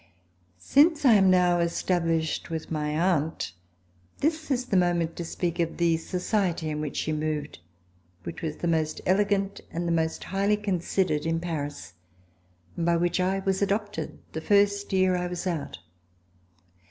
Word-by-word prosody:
Since 295 Hz, -, +3 dB
I 245 Hz, -, +8 dB
am 195 Hz, -3 st, +5 dB
now 180 Hz, -1 st, +4 dB
established 165 Hz, -2 st, 0 dB
with 160 Hz, -1 st, -5 dB
my 150 Hz, -1 st, -1 dB
aunt, 160 Hz, -, 0 dB, 0.6 s
this 310 Hz, +1 st, -1 dB
is 255 Hz, -2 st, 0 dB
the 200 Hz, -, -1 dB
moment 175 Hz, -2 st, +2 dB
to 175 Hz, -, -3 dB
speak 170 Hz, 0 st, -3 dB
of 165 Hz, -1 st, -1 dB
the 170 Hz, -1 st, +3 dB
society 180 Hz, -2 st, -1 dB
in 150 Hz, 0 st, -3 dB
which 150 Hz, -2 st, -4 dB
she 155 Hz, -, -1 dB
moved, 150 Hz, -, -3 dB, 0.6 s
which -, -, -7 dB
was 155 Hz, -3 st, -3 dB
the 175 Hz, -, -3 dB
most 160 Hz, -2 st, 0 dB
elegant 195 Hz, +1 st, +1 dB
and 170 Hz, +1 st, -3 dB
the -, -, +1 dB
most 160 Hz, -1 st, 0 dB
highly 200 Hz, +2 st, +1 dB
considered 185 Hz, -5 st, 0 dB
in 165 Hz, 0 st, 0 dB
Paris, 145 Hz, -, -5 dB, 0.8 s
and 170 Hz, -, -2 dB
by 170 Hz, 0 st, +3 dB
which 175 Hz, +1 st, 0 dB
I 190 Hz, +1 st, 0 dB
was 190 Hz, 0 st, +1 dB
adopted 200 Hz, -4 st, -2 dB
the 160 Hz, -, -5 dB
first 200 Hz, +2 st, +2 dB
year 185 Hz, -1 st, +3 dB
that 180 Hz, -, 0 dB
I 180 Hz, -, -2 dB
was 180 Hz, +1 st, -5 dB
out. 170 Hz, -6 st, -3 dB
175 Hz, 165 wpm, -27 LUFS, 160-195 Hz, 0.8 s, I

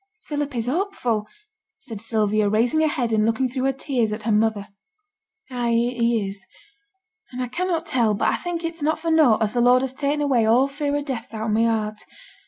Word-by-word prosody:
'Philip 290 Hz, -2 st, -3 dB
is 230 Hz, -2 st, -1 dB
hopeful,' 250 Hz, -, -1 dB, 0.5 s
said 225 Hz, -6 st, -8 dB
Sylvia, 215 Hz, -2 st, +1 dB
raising 235 Hz, +8 st, +2 dB
her 315 Hz, -, +3 dB
head 255 Hz, -7 st, -1 dB
and 215 Hz, -1 st, +3 dB
looking 230 Hz, +4 st, +1 dB
through 255 Hz, +1 st, -3 dB
her 270 Hz, -, +3 dB
tears 255 Hz, -4 st, -1 dB
at 215 Hz, 0 st, -5 dB
her 225 Hz, -, 0 dB
mother. 210 Hz, -1 st, +1 dB, 0.8 s
'Ay, 240 Hz, -2 st, -1 dB
he 235 Hz, -2 st, +1 dB
is. 195 Hz, 0 st, -7 dB, 0.9 s
And 250 Hz, -, -7 dB
I 250 Hz, -, -1 dB
cannot 340 Hz, +4 st, -2 dB
tell, 235 Hz, -9 st, +1 dB
but 200 Hz, -, +1 dB
I -, -, +1 dB
think 350 Hz, -1 st, -4 dB
it's 330 Hz, -1 st, -4 dB
not 310 Hz, +2 st, +1 dB
for 330 Hz, -, -2 dB
nought 285 Hz, -9 st, +4 dB
as 210 Hz, -, -1 dB
the 245 Hz, -, +1 dB
Lord 250 Hz, +1 st, +5 dB
has 265 Hz, -1 st, -3 dB
ta'en 285 Hz, +2 st, -1 dB
away 270 Hz, -6 st, +2 dB
all 235 Hz, +5 st, +4 dB
fear 285 Hz, +1 st, -2 dB
o' 290 Hz, -, -1 dB
death 255 Hz, -5 st, -5 dB
out 220 Hz, -, -4 dB
o' -, -, -2 dB
my 220 Hz, +2 st, +2 dB
heart. 215 Hz, -2 st, -1 dB
245 Hz, 210 wpm, -23 LUFS, 220-285 Hz, 0.9 s, Lord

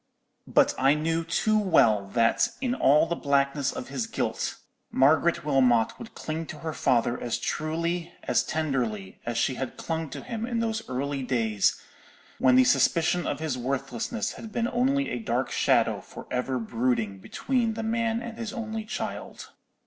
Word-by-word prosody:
"But -, -, +4 dB
I 135 Hz, +3 st, +5 dB
knew 165 Hz, +2 st, 0 dB
too 215 Hz, +6 st, +1 dB
well 110 Hz, -, +3 dB
that, 115 Hz, -1 st, +3 dB
in 255 Hz, -2 st, 0 dB
all 150 Hz, -, +4 dB
the 170 Hz, +1 st, -2 dB
blackness 140 Hz, -1 st, +1 dB
of -, -, -7 dB
his 130 Hz, -4 st, -3 dB
guilt, -, -, -2 dB, 0.3 s
Margaret 155 Hz, +5 st, +3 dB
Wilmot 125 Hz, -6 st, +3 dB
would 230 Hz, -, -10 dB
cling 160 Hz, +1 st, -4 dB
to -, -, -7 dB
her 160 Hz, -, -2 dB
father 120 Hz, -3 st, +1 dB
as 120 Hz, -2 st, -1 dB
truly, 170 Hz, +2 st, -2 dB
as -, -, +2 dB
tenderly, 125 Hz, -11 st, -2 dB
as 120 Hz, -1 st, -1 dB
she 130 Hz, -, +2 dB
had 130 Hz, -, -4 dB
clung 160 Hz, -2 st, -3 dB
to -, -, -7 dB
him 230 Hz, -2 st, -5 dB
in 235 Hz, -1 st, -1 dB
those 225 Hz, -1 st, -1 dB
early 135 Hz, +2 st, -2 dB
days 115 Hz, -5 st, +1 dB, 0.6 s
when 130 Hz, -1 st, +5 dB
the 130 Hz, -, +7 dB
suspicion 165 Hz, +6 st, +2 dB
of 145 Hz, -, -2 dB
his 155 Hz, -5 st, -2 dB
worthlessness 140 Hz, -, -2 dB
had 225 Hz, -, -9 dB
been 235 Hz, +1 st, 0 dB
only 270 Hz, +3 st, +1 dB
a 120 Hz, -, -2 dB
dark 115 Hz, -, -1 dB
shadow -, -, +2 dB
for -, -, -11 dB
ever 125 Hz, +1 st, -1 dB
brooding 115 Hz, -3 st, -1 dB
between 235 Hz, -, -1 dB
the 225 Hz, -, -3 dB
man 230 Hz, +1 st, 0 dB
and 235 Hz, -1 st, -7 dB
his 230 Hz, -3 st, -4 dB
only 225 Hz, -3 st, -4 dB
child. 215 Hz, -, -6 dB
155 Hz, 170 wpm, -27 LUFS, -, 0.6 s, the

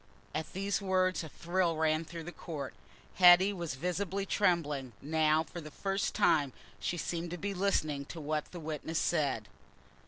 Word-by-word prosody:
At 155 Hz, 0 st, -4 dB
these 195 Hz, +2 st, -1 dB
words 185 Hz, -2 st, +1 dB
a 160 Hz, -, -7 dB
thrill 170 Hz, +2 st, 0 dB
ran 160 Hz, 0 st, +2 dB
through 165 Hz, 0 st, -7 dB
the 175 Hz, -, -7 dB
court. 150 Hz, -6 st, -6 dB, 0.4 s
Hetty 185 Hz, +2 st, +8 dB
was 170 Hz, -7 st, -4 dB
visibly 185 Hz, +5 st, -2 dB
trembling; 150 Hz, -, +1 dB
now, 155 Hz, +1 st, +2 dB
for 170 Hz, +1 st, -8 dB
the 155 Hz, -, -8 dB
first 195 Hz, +5 st, -2 dB
time, 145 Hz, -5 st, +3 dB, 0.3 s
she 175 Hz, -, -2 dB
seemed 170 Hz, +1 st, -3 dB
to 175 Hz, -, -4 dB
be 200 Hz, +3 st, -3 dB
listening 155 Hz, -7 st, 0 dB
to 165 Hz, -, -8 dB
what 155 Hz, 0 st, -1 dB
a 175 Hz, -, -7 dB
witness 160 Hz, 0 st, -4 dB
said. 140 Hz, -12 st, +1 dB
165 Hz, 165 wpm, -32 LUFS, 155-185 Hz, 0.4 s, Hetty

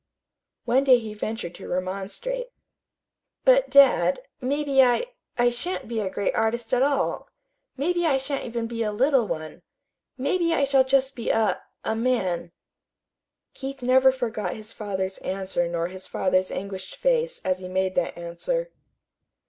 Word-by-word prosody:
One 255 Hz, +3 st, +3 dB
day 260 Hz, -2 st, +7 dB
he 220 Hz, -3 st, -6 dB
ventured 215 Hz, -4 st, -4 dB
to -, -, -10 dB
remonstrate. 200 Hz, -, -3 dB, 1.0 s
"But, -, -, +5 dB
dad, 280 Hz, -, +5 dB, 0.2 s
maybe 275 Hz, +1 st, +2 dB
I 250 Hz, -, +3 dB, 0.3 s
I 240 Hz, 0 st, +4 dB
shan't 340 Hz, +10 st, -4 dB
be 230 Hz, -1 st, -2 dB
a 200 Hz, -3 st, -1 dB
great 200 Hz, +1 st, -1 dB
artist 230 Hz, +2 st, -1 dB
at 250 Hz, -, +3 dB
all. 280 Hz, +1 st, 0 dB, 0.5 s
Maybe 345 Hz, +4 st, +1 dB
I 275 Hz, -4 st, +3 dB
shan't 270 Hz, +1 st, -3 dB, 0.3 s
be 235 Hz, 0 st, -6 dB
even 230 Hz, -, 0 dB
a 210 Hz, -, -1 dB
little 260 Hz, +1 st, +3 dB
one. 155 Hz, 0 st, -5 dB, 0.6 s
Maybe 335 Hz, +5 st, +1 dB
I 280 Hz, -, +2 dB
shall 275 Hz, -1 st, +4 dB
be 260 Hz, -, -13 dB
just 270 Hz, -1 st, +2 dB
a 225 Hz, -1 st, +1 dB, 0.2 s
a 220 Hz, -, -1 dB
man." 195 Hz, -8 st, 0 dB, 1.0 s
Keith 270 Hz, -1 st, -7 dB
never 260 Hz, +1 st, +5 dB
forgot 240 Hz, -5 st, -3 dB
his 215 Hz, 0 st, -7 dB
father's 190 Hz, -2 st, -3 dB
answer 190 Hz, -2 st, -1 dB
nor 170 Hz, 0 st, -1 dB
his 185 Hz, +1 st, -7 dB
father's 185 Hz, 0 st, +1 dB
anguished 190 Hz, -1 st, -6 dB
face -, -, +1 dB
as 185 Hz, 0 st, +1 dB
he 185 Hz, -, -7 dB
made 190 Hz, 0 st, 0 dB
that 175 Hz, -2 st, -1 dB
answer. 335 Hz, -, -3 dB
240 Hz, 155 wpm, -25 LUFS, 190-275 Hz, 1.0 s, day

